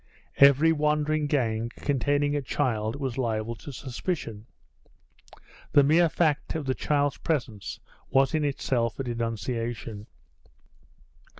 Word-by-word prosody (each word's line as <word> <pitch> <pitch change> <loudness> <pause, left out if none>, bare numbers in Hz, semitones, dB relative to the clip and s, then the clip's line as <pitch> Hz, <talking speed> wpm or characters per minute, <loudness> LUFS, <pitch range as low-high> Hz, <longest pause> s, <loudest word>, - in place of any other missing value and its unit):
Every 140 +4 +6
wandering 150 0 +1
gang 115 -6 0
containing 145 +1 0
a 145 - 0
child 115 -4 -1
was 135 -3 -3
liable 115 -2 -1
to 145 - -9
suspicion. 125 - -5 1.3
The 145 - +7
mere 165 +4 +4
fact 155 -2 0
of 155 -3 -3
the 130 - +1
child's 145 +1 0
presence 120 -11 -3 0.3
was 135 +2 +3
in 155 -1 +1
itself 130 -5 -1
a - - -1
denunciation. 115 -2 -4
135 Hz, 115 wpm, -27 LUFS, 115-145 Hz, 1.3 s, The